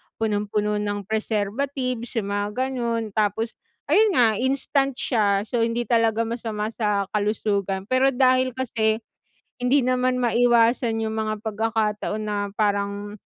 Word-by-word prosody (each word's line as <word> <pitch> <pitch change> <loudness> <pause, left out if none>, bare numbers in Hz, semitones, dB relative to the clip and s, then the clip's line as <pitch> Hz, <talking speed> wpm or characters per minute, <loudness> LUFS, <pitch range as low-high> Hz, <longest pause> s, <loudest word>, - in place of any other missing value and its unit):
punong-puno 210 -1 -1
ng 205 0 -2
preservatives 230 +4 -2
yung 200 -3 -1
mga 205 0 -1
ganon 235 -4 -2
tapos 215 +2 -1 0.3
ayun 425 -3 +4
nga 245 -2 +6
instant 270 +1 0
siya, 205 -6 +1
so, 235 +2 -2
hindi 230 +1 0
talaga 230 -1 +2
masama 225 -2 -3
sa 205 -3 -1
kalusugan 200 -2 -1
pero 255 +1 +4
dahil 255 -1 +3
kasi 225 -3 0 0.6
hindi 255 +3 +4
naman 255 0 +1
maiwasan 235 -1 +3
yung 220 0 -2
mga 215 -1 -2
pagkakataon 215 -1 -1
na 205 -1 -2
parang 205 0 -1
225 Hz, 125 wpm, -24 LUFS, 210-245 Hz, 0.6 s, nga